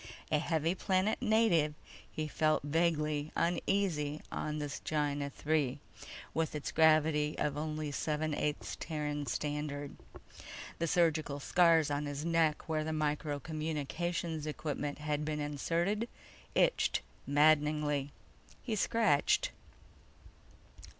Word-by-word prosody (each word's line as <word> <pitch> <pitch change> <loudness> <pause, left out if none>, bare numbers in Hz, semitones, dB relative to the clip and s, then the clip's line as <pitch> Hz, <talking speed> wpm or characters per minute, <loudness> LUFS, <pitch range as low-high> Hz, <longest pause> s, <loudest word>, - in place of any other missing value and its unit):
A 150 - +3
heavy 165 +1 +1
planet 190 +3 +1
native, 215 -10 +3 0.4
he 155 0 -3
felt 155 0 +1
vaguely 150 -1 0
uneasy 170 -4 0
on 155 0 -3
this 145 -2 -4
Gienah 145 -2 -1 0.2
III 145 -4 +2 0.5
with 160 -1 -1
its 150 - -3
gravity 155 -1 +4
of 145 -1 0
only 155 0 -3
seven 155 +1 -1
eighths 150 +1 -2
Terran 150 -2 -3
Standard. 145 +1 -3 0.8
The 170 - 0
surgical 155 -4 +2
scars 165 -1 +4
on 145 +1 -1
his 145 +2 -4
neck 165 -2 +2
where 155 -1 0
the 160 - -3
micro 150 -1 -1
communications 160 +2 -3
equipment 150 -1 -3
had 150 0 -2
been 150 0 -2
inserted 170 +9 -1 0.5
itched - - +3 0.3
maddeningly. 150 -1 +3 0.5
He 230 -4 -1
scratched. 210 -8 +2
155 Hz, 110 wpm, -33 LUFS, 150-165 Hz, 0.8 s, gravity